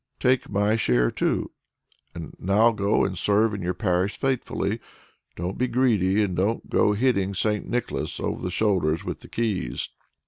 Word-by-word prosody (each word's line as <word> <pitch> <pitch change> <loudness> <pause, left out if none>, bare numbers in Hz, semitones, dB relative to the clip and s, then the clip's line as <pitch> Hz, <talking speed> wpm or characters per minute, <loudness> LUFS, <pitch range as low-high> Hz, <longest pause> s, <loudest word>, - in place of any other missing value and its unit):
"Take 130 0 +2
my 105 +2 +2
share - - +2
too. - - -1 0.6
And 85 -2 -7
now 105 +5 +4
go 105 -1 +1
and 95 -1 -2
serve 105 +4 +2
in 100 - -4
your 90 +1 -2
parish 95 -1 0
faithfully; 120 -5 -1 0.6
don't 90 +3 -4
be 125 - +2
greedy, 110 -5 +2
and 95 -3 -2
don't 105 +6 0
go 105 - +3
hitting 100 -4 +1 0.3
Nicholas 120 -1 -2
over - - -3
the 90 - -2
shoulders 90 -6 +1
with - - -4
the - - -13
keys." 95 - -2
100 Hz, 160 wpm, -25 LUFS, 90-115 Hz, 0.6 s, now